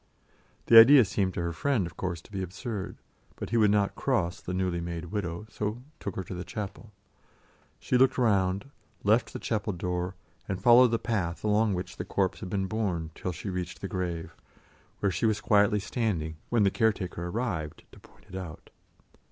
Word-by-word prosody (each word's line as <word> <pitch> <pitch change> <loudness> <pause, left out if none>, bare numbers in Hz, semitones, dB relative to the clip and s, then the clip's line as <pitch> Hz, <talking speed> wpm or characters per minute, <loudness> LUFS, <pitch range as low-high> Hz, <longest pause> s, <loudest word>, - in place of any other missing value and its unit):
The 115 - +10
idea 130 +2 +9
seemed 95 -1 -1
to - - -1
her 85 0 -2
friend, 120 - 0
of 85 -2 -8
course, 90 -3 -3
to - - -18
be 95 -2 -3
absurd; 100 +3 -5 0.4
but - - -6
he 115 - +2
would 105 -2 +5
not 100 -1 +2
cross 85 +1 -1
the - - -5
newly 90 -2 -1
made 85 0 -5
widow, 95 -2 -3
so 110 +2 -4 0.2
took 100 - -5
her 95 - -3
to 95 - -8
the 90 0 -5
chapel. 105 +4 -7 0.9
She 125 - +1
looked 130 0 +4
round, 100 0 +1 0.3
left 110 +4 +3
the - - -5
chapel 105 -2 -2
door, 90 +1 -3 0.3
and 95 -2 -3
followed 120 +4 +7
the 115 - +1
path 95 -8 -2
along 105 -1 +2
which 90 - -6
the - - -3
corpse 95 -2 -1
had 95 - -6
been 95 0 -1
borne 95 -6 -2
till 90 - -4
she 90 +4 -5
reached 90 -1 -5
the - - -3
grave, 85 -3 -4 0.7
where 100 - +2
she 110 - +1
was 105 -1 +1
quietly 105 0 +3
standing 95 -8 -2
when 115 -3 +3
the 100 - +3
caretaker 95 -6 0
arrived 90 -7 -3
to - - -15
point - - -21
it - - -10
out. 90 -4 -8
95 Hz, 195 wpm, -28 LUFS, 90-110 Hz, 0.9 s, The